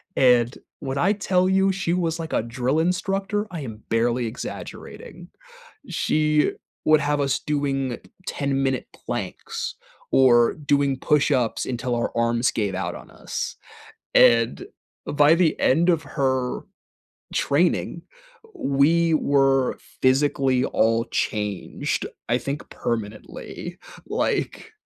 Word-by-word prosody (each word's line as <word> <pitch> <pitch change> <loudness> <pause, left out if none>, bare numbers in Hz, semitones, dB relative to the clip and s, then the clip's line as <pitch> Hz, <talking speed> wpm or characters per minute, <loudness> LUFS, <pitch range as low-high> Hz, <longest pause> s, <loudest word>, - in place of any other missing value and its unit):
and 125 -2 +4 0.3
when 135 0 -3
I 180 +8 +3
tell 185 -3 +1
you 190 +1 +3
she 185 -3 -1
was 170 -2 0
like 160 -1 -5
a - - +2
drill 125 +5 -1
instructor, 195 +4 0
I 170 -4 -5
am 110 -5 -8
barely 120 +2 +1
exaggerating. 125 - -8 0.6
She 150 -1 +1 0.3
would 155 0 +5
have 145 0 0
us 140 -1 +1
doing 135 -4 -2 0.3
ten-minute 135 -2 -1 0.2
planks - - -4 0.4
or 120 -3 +5
doing 140 -2 +1
push-ups 140 -4 +1
until 125 0 -2
our 120 0 -1
arms 115 +1 +2
gave 105 -3 -1
out 90 -2 -3
on - - -12
us, - - -5 0.6
and 115 -1 +4 0.4
by 145 +2 +5
the 170 -3 +2
end 165 +7 +3
of 165 -3 +3
her 130 -3 -1 0.7
training, 170 +3 +1 0.5
we 160 - +2
were 135 -3 +2 0.2
physically 130 -1 +2
all 115 -1 +2
changed, 105 -3 -2 0.2
I 120 - +3
think 140 +4 -5
permanently, 110 -2 -5 0.3
like, - - -2
135 Hz, 115 wpm, -23 LUFS, 120-155 Hz, 0.7 s, would